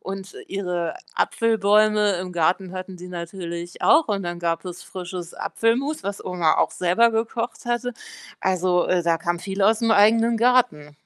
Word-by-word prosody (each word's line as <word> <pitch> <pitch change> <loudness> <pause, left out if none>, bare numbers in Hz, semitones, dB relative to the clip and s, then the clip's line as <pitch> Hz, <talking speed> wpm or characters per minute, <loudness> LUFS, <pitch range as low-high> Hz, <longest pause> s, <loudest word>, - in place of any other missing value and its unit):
und 195 0 -7
ihre 180 -4 -3 0.2
Apfelbäume 215 -1 +3
im 185 0 -6
Garten 175 +2 0
hatten 185 0 -7
sie 180 +1 -9
natürlich 170 0 -7
auch 315 +1 +5
und 200 -2 -1
dann 175 -1 -4
gab 170 +1 -2
es 180 0 -7
frisches 180 -2 -7
Apfelmus, 250 +3 -1
was 200 0 -5
Oma 175 -4 +1
auch - - +2
selber 185 +7 +2
gekocht 230 +1 -3
hatte. 240 +1 -1 0.5
Also, 185 -1 +1
äh, 180 -1 +1
da 165 -1 +1
kam 175 +1 -2
viel 195 +2 -5
aus'm 225 +3 +3
eigenen 225 +3 +4
Garten. 235 - +2
190 Hz, 155 wpm, -23 LUFS, 175-225 Hz, 0.5 s, auch